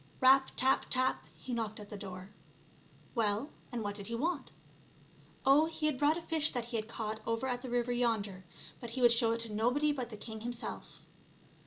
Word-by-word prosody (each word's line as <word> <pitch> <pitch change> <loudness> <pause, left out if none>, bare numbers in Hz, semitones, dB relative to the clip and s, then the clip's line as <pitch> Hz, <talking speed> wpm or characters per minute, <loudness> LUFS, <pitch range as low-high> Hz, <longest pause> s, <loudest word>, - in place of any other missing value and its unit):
Rap! 265 +1 +6
tap! 265 +1 +4
tap! 255 0 +2
he 255 - -6
knocked 220 -2 -2
at 205 -1 -10
the - - -5
door. 190 -1 -7 0.8
Well, 225 +3 0 0.2
and 240 -3 -3
what 205 0 -2
did 200 -1 -7
he 230 - -3
want? 290 +2 -1 0.9
Oh, 285 +4 +6
he 320 -1 -3
had 300 -4 +1
brought 295 +2 +4
a 340 - -6
fish 315 -2 +1
that 245 -3 -2
he 235 0 -5
had 215 -1 -1
caught 220 -1 -4
over 230 +2 0
at 245 -1 -1
the 255 - -6
river 245 0 0
yonder, 220 -6 0 0.4
but 235 - -6
he 255 +3 -4
would 240 -1 +7
show 230 -1 +3
it 230 - -2
to 225 -2 -4
nobody 250 +8 +2
but 255 -5 -3
the 215 - -8
king 220 0 -7
himself. 240 +1 -5
240 Hz, 205 wpm, -33 LUFS, 220-265 Hz, 0.9 s, would